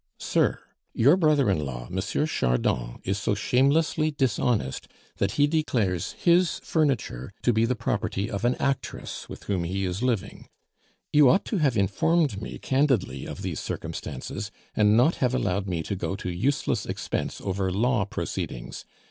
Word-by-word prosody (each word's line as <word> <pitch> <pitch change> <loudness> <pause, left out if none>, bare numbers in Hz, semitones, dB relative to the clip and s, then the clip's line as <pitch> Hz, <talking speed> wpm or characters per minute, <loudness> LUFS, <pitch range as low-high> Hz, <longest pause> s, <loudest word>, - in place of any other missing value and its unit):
_ - - -59 0.2
"SIR, - - +2 0.4
Your 140 +8 +6
brother 155 - +3
in 75 -5 0
law, - - -5
M. 95 - -3 0.3
Chardon, - - 0
is 95 +2 -1
so 100 - 0
shamelessly 145 +8 +2
dishonest, 120 - 0 0.3
that 100 - 0
he 145 - +4
declares 120 - 0
his 175 0 +3
furniture 130 - 0
to 120 - +3
be 110 +1 +3
the 125 +2 0
property 100 -2 -1
of 105 -1 -4
an 120 +1 +3
actress 135 -1 -3
with - - -9
whom 95 -4 -1
he 95 +3 -2
is 90 +3 -3
living. 120 -6 -2 0.7
You 150 -3 +7
ought 190 - +3
to 215 - -1
have 140 -8 +2
informed 110 - +2
me - - -6
candidly 130 - 0
of - - -7
these - - -3
circumstances, - - -5 0.3
and 105 0 +4
not 130 +8 +4
have 125 -1 +1
allowed 100 -4 0
me 85 -3 -2
to 100 - -3
go 90 0 -3
to 90 - -4
useless 130 +12 0
expense - - -3
over 95 -1 -1
law 115 +3 +2
proceedings. 65 -10 -5
110 Hz, 165 wpm, -26 LUFS, 95-140 Hz, 0.7 s, You